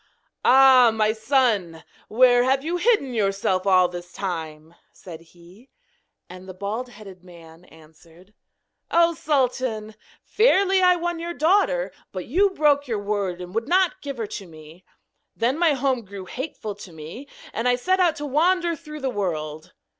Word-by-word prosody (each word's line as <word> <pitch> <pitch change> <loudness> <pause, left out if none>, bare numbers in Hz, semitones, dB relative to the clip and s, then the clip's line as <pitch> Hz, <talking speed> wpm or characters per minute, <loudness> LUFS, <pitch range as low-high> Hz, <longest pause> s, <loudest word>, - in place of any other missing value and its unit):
'Ah, 260 -2 +7
my 215 -1 +1
son! 220 - 0 0.2
where 245 +1 +4
have 265 +1 +1
you 345 +2 -1
hidden 350 - +1
yourself 195 -3 -1
all 185 -2 +5
this 175 0 -9
time?' 160 -4 -6 0.2
said 165 -3 -12
he. 175 +8 -19 0.6
And 185 +1 -12
the 185 - -9
bald 210 +6 -5
headed 195 -6 -13
man 170 -1 -16
answered: 165 +4 -20 0.6
'Oh, 335 0 +3
Sultan! 255 -8 -1 0.3
Fairly 390 -4 +3
I 360 -1 +5
won 345 -1 -3
your 340 +1 -5
daughter, 405 +10 +1 0.2
but 185 -2 -6
you 385 - +2
broke 295 -5 +1
your 225 -3 -2
word, 200 -3 -3
and 180 0 -9
would 225 +2 -2
not 365 +1 +1
give 280 -2 -6
her 225 - -3
to 200 -2 -8
me. 160 +2 -15 0.5
Then 255 +6 -1
my 335 -3 +3
home 265 -3 -1
grew 200 -1 -10
hateful 245 -3 -6
to 200 -2 -12
me, 165 - -10 0.3
and 230 +3 -2
I 245 - +3
set 370 +10 0
out 350 -4 +3
to 295 - -6
wander 340 +4 +1
through 305 -2 -10
the 265 -1 -2
world! 155 -7 -4
230 Hz, 160 wpm, -23 LUFS, 185-295 Hz, 0.6 s, Ah